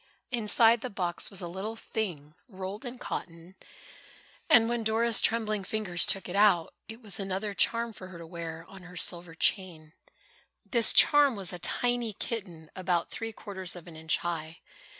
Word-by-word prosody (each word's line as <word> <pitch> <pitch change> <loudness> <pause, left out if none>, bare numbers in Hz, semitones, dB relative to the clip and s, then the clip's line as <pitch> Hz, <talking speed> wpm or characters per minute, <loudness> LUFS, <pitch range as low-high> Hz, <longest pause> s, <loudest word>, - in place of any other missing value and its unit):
Inside 230 0 +4
the 255 - -4
box 180 -4 -1
was 195 -2 -4
a 175 - -5
little 195 +6 -5
thing 175 -11 -5
rolled 195 +2 -7
in 245 +1 -6
cotton, 170 -5 -7 1.0
and 225 -1 +7
when 235 -1 -1
Dora's 225 0 +2
trembling 215 -3 +2
fingers 185 -4 0
took 195 - 0
it 180 - -5
out, 200 -5 +4
it 225 +2 -9
was 210 -2 0
another 195 +1 -3
charm 230 +3 +1
for 185 - -10
her 185 -2 -11
to 170 - -9
wear 165 -1 -7
on 195 -1 -13
her 180 0 -12
silver 170 -1 +1
chain. 165 -3 -1 0.7
This 235 -3 +4
charm 290 -4 +7
was 190 -4 -4
a 180 - -5
tiny 240 +4 0
kitten, 180 -8 -6
about 180 -2 -1
three 225 0 -4
quarters 190 -4 -4
of 175 - -10
an 165 - -11
inch 160 +1 0
high. 165 -2 -5
195 Hz, 170 wpm, -29 LUFS, 175-225 Hz, 1.0 s, and